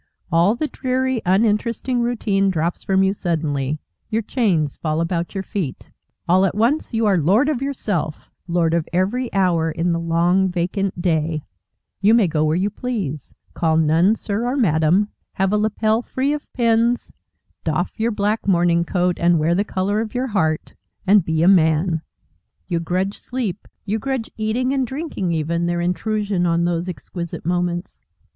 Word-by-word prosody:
All 170 +7 +4
the 305 +5 -1
dreary, 260 -2 -1
uninteresting 230 +5 +1
routine 210 -5 +1
drops 170 -1 -1
from 190 0 +2
you 190 0 +2
suddenly, 155 -6 -2 0.3
your 220 +1 0
chains 185 - 0
fall 155 -1 -2
about 170 +1 -2
your 195 - -2
feet. 185 - -5 0.4
All 185 +2 +4
at 195 -1 +1
once 240 +9 +1
you 225 -1 +1
are 200 -3 +3
Lord 200 - +3
of 275 -5 -1
yourself, 205 - -3 0.2
Lord 170 -2 +1
of 170 -2 0
every 205 +8 0
hour 175 -4 +2
in 165 +2 -1
the 170 - 0
long, 170 +3 +2
vacant 180 +2 -2
day; 160 -3 0 0.6
you 210 +3 +5
may 225 -5 +4
go 155 -2 0
where 155 +1 +2
you 195 +4 0
please, 190 - -4 0.2
call 160 -1 +1
none 165 +6 +4
Sir 220 +2 -2
or 255 +3 -1
Madame, 175 - +3 0.2
have 195 +1 0
a - - +4
lappel 215 +1 +1
free 265 +3 -1
of 300 - -6
pins, 235 0 +1 0.5
doff - - -1
your 225 +1 +2
black 210 -1 -1
morning 170 -2 +3
coat, 180 0 0
and 170 0 +4
wear 160 +2 +2
the 195 +4 +2
colour 205 +1 -1
of 225 +1 -6
your 250 +1 0
heart, 180 -10 -1 0.3
and 200 0 +5
be 160 -1 0
a - - +4
Man. 165 -2 +3 0.7
You 170 -3 0
grudge 185 +4 -2
sleep, 230 -7 -4 0.2
you 215 +2 -1
grudge 265 -2 -3
eating, 235 +5 0
and 265 -2 0
drinking 265 - -3
even, 170 +2 -1
their 175 0 0
intrusion 195 +1 0
on 170 0 +2
those 175 +1 -1
exquisite 170 -1 -6
moments. 175 0 -2
190 Hz, 170 wpm, -21 LUFS, 170-220 Hz, 0.7 s, you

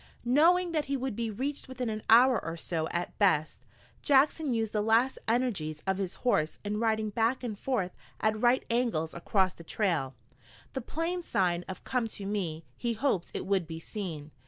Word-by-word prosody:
Knowing 340 +8 +4
that 310 -3 0
he 275 0 -1
would 260 -3 -3
be 230 0 -2
reached 270 +7 -3
within 255 -1 -4
an 215 -1 -3
hour 240 0 +6
or 165 0 -4
so 160 -1 -2
at 175 +1 -3
best, 160 -7 +2 0.4
Jackson 290 +1 +3
used 225 -2 -1
the 210 - +1
last 225 +5 +3
energies 205 -11 0
of 190 0 0
his 190 -2 -3
horse 155 -10 +2
in 210 +1 -1
riding 220 -1 +1
back 230 +4 +1
and 215 -4 -4
forth 215 -9 -1 0.3
at 215 0 +1
right 245 +1 +3
angles 230 -10 0
across 185 +2 +1
the 170 - -12
trail, 165 -8 -1 0.6
the 265 - -2
Plains 335 +7 -3
sign 175 -2 +1
of 190 - -7
"Come 250 -3 0
to 205 -2 -8
me!" 175 -6 -2
He 235 - -1
hoped 215 -7 0
it - - -3
would 190 -4 +1
be 160 0 -6
seen. 165 -5 -6
215 Hz, 185 wpm, -30 LUFS, 180-255 Hz, 0.6 s, hour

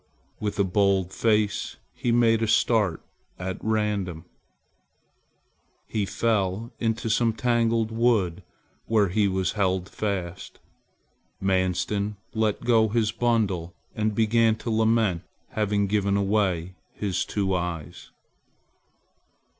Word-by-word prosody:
With 105 -1 -3
a 100 - +3
bold 95 -1 +1
face, 105 -2 +1 0.2
he 120 - -1
made 115 -1 +4
a 115 - +1
start 105 -5 +2 0.3
at 95 0 -5
random. 105 -6 -1 1.6
He 105 -3 -2
fell 110 +1 -1
into 115 0 -1
some 115 +1 +2
tangled 115 -1 +1
wood 110 -6 +1 0.5
where 105 -4 +3
he 105 +2 +2
was 95 -1 0
held 95 -2 0
fast. 95 -5 -4 0.8
Manstin 95 +2 0 0.2
let 110 -2 0
go 115 -2 +4
his 110 0 +1
bundle 100 -8 0 0.2
and 110 -1 -1
began 115 0 +3
to 115 +1 -5
lament 110 -5 +2 0.3
having 105 -1 0
given 100 0 +1
away 95 -4 0 0.2
his 95 -3 -1
two 100 -2 -1
eyes. 85 -3 -4
105 Hz, 110 wpm, -25 LUFS, 95-110 Hz, 1.6 s, made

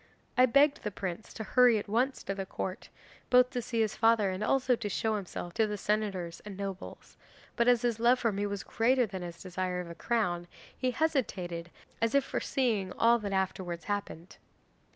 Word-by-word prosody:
I 255 +1 +6
begged 280 +4 +4
the 210 - -2
prince 190 0 -5
to 220 - -5
hurry 245 +1 +5
at 205 - -4
once 245 +6 0
to 195 - -2
the 195 -1 -5
Court, 190 -1 -5 0.4
both 250 0 +5
to 250 -2 -2
see 230 -1 -1
his 215 -2 0
father 225 -3 +3
and 185 +3 -3
also 255 +2 +2
to 225 -3 -4
show 220 +2 0
himself 180 -3 -5
to 220 +3 +2
the 210 0 -3
senators 195 -5 -2
and 205 -2 -8
nobles, 195 -1 -7 0.4
but 235 0 +2
as 245 -1 +4
his 235 -2 0
love 240 +2 +5
for 230 -3 +1
me 205 +1 -1
was 200 -1 -4
greater 250 +2 +2
than 190 -3 -6
his 170 -1 -8
desire 185 0 -2
of 175 -1 -6
a - - -6
crown, 175 -4 -1 0.3
he 255 - 0
hesitated 215 - -1 0.3
as 230 +3 +1
if 280 - +5
foreseeing 225 -9 -1
all 235 +1 +4
that 205 -2 -4
afterwards 185 -3 -2
happened. 200 -4 -4
210 Hz, 195 wpm, -30 LUFS, 185-240 Hz, 0.4 s, I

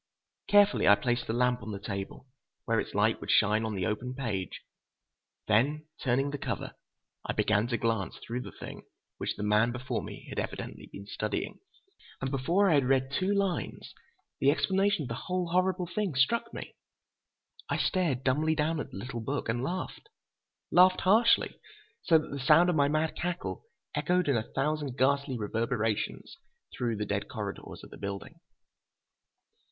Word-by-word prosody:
Carefully 205 0 +5
I 100 - +9
placed 120 +2 -1
the 110 - -1
lamp 125 0 +2
on 100 - -7
the 100 - -4
table, 100 +2 -5 0.4
where 115 -1 +2
its - - -4
light 105 +2 +2
would - - -7
shine 105 +1 +4
on 110 -2 -2
the 95 -2 -1
open 125 +5 -2
page. 110 -9 -3 0.8
Then, 140 +8 +2 0.2
turning 135 +2 +1
the 145 - -4
cover, - - -4 0.5
I - - -2
began 105 +1 +2
to 120 -1 0
glance 115 -6 -1
through 120 +2 -5
the - - -8
thing - - -9 0.4
which - - -2
the - - -5
man 105 +3 +3
before 125 +1 -3
me - - -9
had - - -3
evidently - - -5
been 100 - -9
studying. 105 +1 -3 0.6
And 135 0 -3
before 170 +9 +2
I 175 - +4
had 140 -3 +4
read 135 0 +2
two 185 +7 0
lines, 200 -3 -1 0.5
the 135 - +4
explanation 195 +3 +2
of - - -5
the - - -2
whole 180 -2 -1
horrible 185 +1 +1
thing 185 -2 -2
struck 235 - +2
me. - - -7 1.0
I - - +1
stared 160 -9 +1
dumbly 155 +5 +2
down 155 +1 0
at - - -4
the - - -9
little 120 +3 -5
book 135 +1 -3
and 120 +2 0
laughed. 185 - -4 0.6
Laughed 185 +1 +6
harshly, 225 +5 +4 0.4
so 165 - +5
that 155 - -4
the 140 - -4
sound 170 +7 +5
of - - -1
my 140 -2 +4
mad 155 +2 0
cackle 180 - -3 0.3
echoed 180 -2 +1
in 140 - +3
a 110 -1 -2
thousand 145 -2 -1
ghastly 140 -1 +2
reverberations 115 0 -2 0.4
through 120 -2 -1
the 105 0 -2
dead 100 0 -2
corridors 100 -2 -6
of - - -12
the - - -10
building. 100 -1 -6
135 Hz, 175 wpm, -30 LUFS, 110-170 Hz, 1.0 s, I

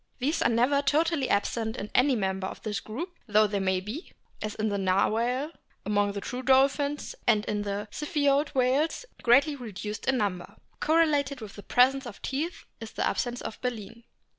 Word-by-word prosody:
These 280 +5 0
are - - +4
never 250 +5 +3
totally 295 0 +1
absent 220 +3 0
in 205 - -6
any 260 +1 +4
member 190 -3 -1
of - - -9
this 210 -2 -2
group, 335 - -7
though 215 0 +5
they 205 -1 -1
may 190 -1 +1
be 215 - -7 0.3
as 215 0 -4
in 215 0 -1
the 200 -1 -1
Narwhal 230 - +1 0.3
among 205 0 +1
the 200 - -4
true 250 +4 -5
dolphins, 275 +2 +2
and 215 -3 +4
in 210 -1 -1
the 205 +1 -3
Ziphioid 290 -1 +1
whales 270 - +1 0.2
greatly 275 +5 +4
reduced 210 -4 -6
in 265 -1 +3
number. 195 -5 -2 0.2
Correlated 295 -4 +2
with 215 -3 -9
the 205 - -9
presence 260 +4 +3
of 210 - -9
teeth 310 +6 -3
is 225 -1 -8
the - - -1
absence 245 0 -1
of - - -7
baleen. 230 -2 -5
240 Hz, 180 wpm, -28 LUFS, 210-280 Hz, 0.3 s, though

